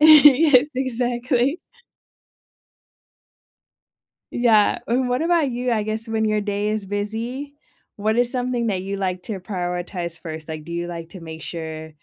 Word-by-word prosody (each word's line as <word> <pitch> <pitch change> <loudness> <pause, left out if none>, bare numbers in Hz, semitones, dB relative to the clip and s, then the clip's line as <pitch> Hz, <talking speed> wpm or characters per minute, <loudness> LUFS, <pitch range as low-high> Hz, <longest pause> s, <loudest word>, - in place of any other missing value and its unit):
Yes, 295 -2 +8
exactly. 250 +3 0 2.7
Yeah, 225 -4 +4
and 250 +2 +1
what 250 +3 +1
about 330 -3 +2
you, 245 +1 -1
I 220 -2 +1
guess 220 +2 -3
when 220 0 0
your 215 -1 +1
day 205 0 -1
is 215 -2 -2
busy, 225 +8 -4 0.4
what 215 +2 0
is 245 0 +3
something 245 -2 -1
that 190 -4 0
you 195 +1 -4
like 185 -2 -2
to 205 -4 -4
prioritize 175 -2 -4
1st? 160 -1 -7
Like, 155 -1 -6
do 170 - -9
you 170 0 -2
like 170 -1 -6
to 185 - -10
make 160 -1 -9
sure 160 -1 -6
215 Hz, 150 wpm, -22 LUFS, 180-250 Hz, 2.7 s, Yes